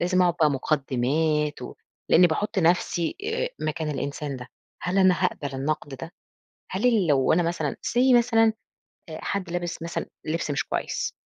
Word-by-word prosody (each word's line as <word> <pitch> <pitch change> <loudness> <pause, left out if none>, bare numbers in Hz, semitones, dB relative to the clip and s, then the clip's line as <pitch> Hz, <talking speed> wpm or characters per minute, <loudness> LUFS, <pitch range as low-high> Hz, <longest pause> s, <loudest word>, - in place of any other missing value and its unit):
لازم 185 +1 +2
أقعُد 175 -2 +3
بقى 155 - +5
مُقدِّمات 150 +2 0 0.5
ولإني 180 +2 +7
باحُط 195 +5 -1
نفْسي 170 -1 +1
آآ 480 +3 -1 0.2
مكان 155 0 -2
الإنسان 140 0 -4
ده، 125 0 -9 0.4
هل 180 +2 0
أنا 185 -2 +4
هاقبَل 145 -6 -2
النقد 140 +1 -2
ده؟ 165 +6 -8 0.6
هل 190 +6 -1
اللي 215 -7 +3
لو 140 -1 +3
أنا 175 +2 +3
مثلًا 165 -3 -1
say 250 +1 +4
مثلًا 225 -2 +3 0.6
أ 155 - -7
حد 200 -3 -2
لابس 175 -1 -3
مثلًا 170 - -3 0.2
لِبس 155 -1 -2
مش 140 - -1
كويس، - - -2
165 Hz, 160 wpm, -25 LUFS, 150-185 Hz, 0.6 s, ولإني